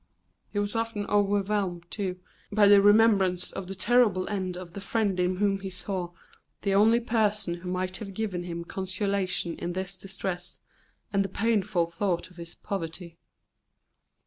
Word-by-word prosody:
He - - -6
was 205 +1 -1
often 225 -2 -1
overwhelmed, 200 -3 +1
too, 185 +1 -3 0.3
by 205 0 +5
the 200 0 +8
remembrance 205 -3 +4
of 190 - -6
the 195 - -5
terrible 210 -4 +3
end 185 -3 -2
of 180 -2 -9
the 200 - -6
friend 205 -3 0
in 180 +1 +2
whom 195 0 +1
he 195 0 -5
saw 185 -1 -4 0.5
the 200 -1 +1
only 220 +4 +5
person 215 -6 +1
who 180 +1 -7
might 185 0 -2
have 200 -4 -8
given 200 -5 -2
him 170 -1 -5
consolation 190 -2 -1
in 175 - -3
this 190 +1 -3
distress, 185 -1 -5 0.5
and 195 0 +3
the 195 - -4
painful 200 -4 +1
thought 175 +1 -2
of 180 - -19
his 170 0 -8
poverty. 170 -2 -5
195 Hz, 160 wpm, -28 LUFS, 180-205 Hz, 0.5 s, the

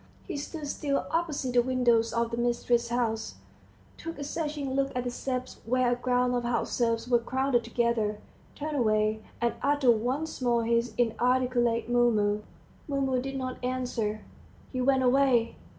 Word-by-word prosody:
He - - -4
stood 295 +2 -5
still 280 -1 -1
opposite 305 -6 -1
the 245 - +5
windows 240 -2 +2
of 235 0 0
the 230 - -3
mistress's 240 0 +1
house, 230 -2 -1 0.6
took 330 -2 -7
a 285 - -5
searching 295 -2 -3
look 275 0 +1
at 250 - -1
the 245 - -3
steps 255 0 -4
where 250 +2 +2
a - - +2
group 250 0 +1
of 245 -1 0
house 240 -1 -1
serfs 230 -1 0
were 240 -1 +4
crowded 260 0 0
together, 230 -3 0 0.4
turned 300 0 -3
away, 215 -2 +2 0.2
and 235 0 +1
uttered 280 -3 +4
once 255 +8 -1
more 235 -2 +2
his 235 +1 +1
inarticulate 240 0 +1
"Mumu." 220 -4 +2 0.5
Mumu 270 -2 0
did 270 +1 -5
not 255 -1 -5
answer. 245 -4 -2 0.5
He 255 - -1
went 265 0 +3
away. 250 -3 +3
245 Hz, 160 wpm, -28 LUFS, 235-265 Hz, 0.6 s, the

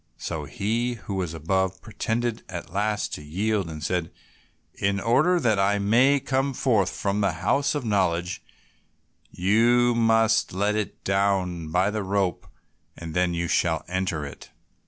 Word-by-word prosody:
So 75 -2 -4
he 115 +6 -1
who 100 -3 -7
was 90 -4 -2
above 95 +4 -1
pretended 115 +1 -2
at 85 -1 -7
last 105 +1 -1
to - - -5
yield, 95 +5 -1
and 75 -1 -7
said, 90 -2 -1 0.6
"In 100 0 0
order 140 - +3
that 110 -8 +2
I 100 +1 +3
may 120 +8 +4
come 135 0 -1
forth 110 -9 +2
from 100 +1 -2
the 100 - +1
house 140 +1 +1
of 145 -4 -3
knowledge 90 -4 0 0.9
you 120 +6 +3
must 115 -2 +3
let 100 +3 +1
it 105 -1 -4
down 95 -4 0
by 95 +4 +2
the 110 0 -2
rope, 95 -2 -1 0.5
and 85 -2 -7
then 90 0 +1
you 85 0 -1
shall 80 -2 +1
enter 90 -4 -2
it." 70 - -10
100 Hz, 155 wpm, -25 LUFS, 90-115 Hz, 0.9 s, may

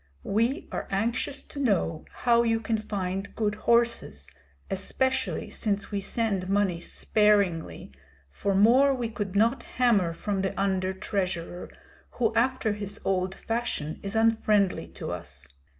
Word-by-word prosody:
We 230 +7 0
are - - -4
anxious 235 +7 -1
to 285 - -9
know 195 - 0
how 235 -1 +3
you 225 -1 +2
can 225 0 -1
find 195 -2 -4
good 210 -2 0
horses, 230 - +1 0.4
especially 260 +7 -1
since 205 -1 -1
we 200 -1 -1
send 195 -4 0
money 195 -4 +1
sparingly, 200 - +1 0.4
for 195 - -2
more 255 +7 +5
we 240 -3 -2
could 205 -3 -4
not 230 +6 +3
hammer 220 -9 +2
from 195 +3 -2
the 190 0 -2
under 190 -1 +1
treasurer, 180 -3 -3 0.4
who 230 -3 +1
after 235 -2 +1
his 205 -1 -5
old 185 0 0
fashion 225 -11 -3
is 200 +2 -5
unfriendly 215 - +2
to 80 - -7
us. - - -8
205 Hz, 135 wpm, -27 LUFS, 190-230 Hz, 0.4 s, more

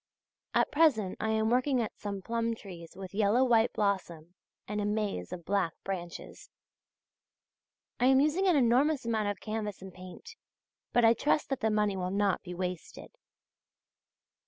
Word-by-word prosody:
At - - +2
present 285 - +3
I 220 - -1
am 220 0 +1
working 255 +1 +2
at 225 - -3
some 200 -2 -5
plum 230 +1 -1
trees 175 -6 -11
with 190 -1 -9
yellow 215 +4 +3
white 235 -2 +3
blossom 175 -5 -2 0.3
and 210 0 -2
a - - -1
maze 205 - -2
of 175 -2 -7
black 195 -5 0
branches. 175 -3 -7 1.5
I 245 - +4
am 265 0 +5
using 305 +7 +2
an 360 - +4
enormous 265 +2 +3
amount 220 -2 0
of 205 - -4
canvas 215 -2 -4
and 190 -1 -10
paint; 185 - -11 0.5
but 240 -1 +4
I 225 - +7
trust 295 +5 0
that 270 - -1
the 220 - +1
money 210 -2 +1
will 180 -1 -2
not 200 0 +1
be 180 -1 -8
wasted. 180 -1 -6
210 Hz, 160 wpm, -30 LUFS, 190-240 Hz, 1.5 s, I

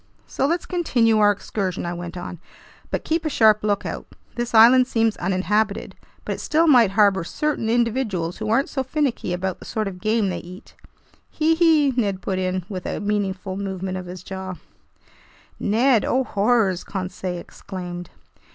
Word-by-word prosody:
"So 270 - -1
let's 340 +3 -1
continue 240 -11 +2
our 205 -1 +6
excursion," 195 -2 -2
I 175 - -3
went 175 0 -7
on, 175 -1 -7 0.5
"but - - -2
keep 325 +1 0
a 310 - -1
sharp 215 -6 +4
lookout. 205 -1 -2 0.3
This 240 -1 -3
island 250 +3 +7
seems 225 -3 +1
uninhabited, 195 +3 0 0.3
but - - -2
it - - -7
still 320 +2 +2
might 245 - +6
harbor 200 -3 +4
certain 290 - -2
individuals 225 -7 0
who 215 -1 -3
aren't 235 +5 +2
so 265 - -2
finicky 265 - -1
about 180 +1 -2
the - - -12
sort 215 -2 -2
of 180 -2 -7
game 215 -2 +1
they 180 - -3
eat!" 180 +2 -12 0.6
"Hee 320 +1 +2
hee!" 320 -4 +4
Ned 200 -6 0
put 190 -1 -1
in, 185 -1 -2
with 185 -4 -6
a - - -3
meaningful 195 -2 -2
movement 190 -1 -4
of 185 -1 -6
his 180 0 -8
jaws. 190 -1 -6 1.0
"Ned! 230 +2 +3
Oh 260 +1 +1
horrors!" 205 -4 +1
Conseil 185 -1 -4
exclaimed. 175 -1 -8
205 Hz, 170 wpm, -22 LUFS, 185-240 Hz, 1.0 s, island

